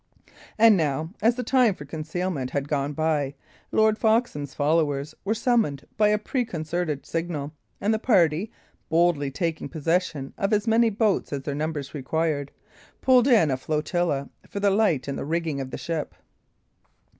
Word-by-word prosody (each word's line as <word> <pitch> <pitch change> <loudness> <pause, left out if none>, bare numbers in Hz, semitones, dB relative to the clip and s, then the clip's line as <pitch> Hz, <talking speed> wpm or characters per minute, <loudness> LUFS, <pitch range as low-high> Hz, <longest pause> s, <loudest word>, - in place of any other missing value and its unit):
And 225 -1 +7
now, 155 -1 -1
as 230 +2 +4
the 250 - -3
time 250 -7 +3
for 145 - -10
concealment 155 -1 -3
had 140 0 -2
gone 145 0 -1
by, 150 -3 0 0.4
Lord 220 0 +3
Foxham's 220 - +1
followers 150 -1 +1
were 215 +3 0
summoned 225 - +1
by 215 -1 +4
a 210 0 +3
preconcerted 175 - -3
signal, 160 -3 -3 0.3
and 210 +2 +1
the 220 - 0
party, 185 -4 +2 0.4
boldly 165 -4 +2
taking 160 +1 -3
possession 165 -2 -1
of 200 +2 +1
as 210 +1 +2
many 230 0 +4
boats 215 -1 0
as 140 -2 -3
their 145 - -3
numbers 150 -1 -3
required, 145 0 -1 0.5
pulled 255 -1 +5
in 215 - +5
a 130 - 0
flotilla 150 0 -1 0.2
for 200 - -4
the 200 0 +3
light 195 -11 +2
in 140 - -3
the - - -4
rigging 160 -2 -2
of 130 - -5
the - - -6
ship. 165 -3 -4
165 Hz, 160 wpm, -25 LUFS, 145-210 Hz, 0.5 s, And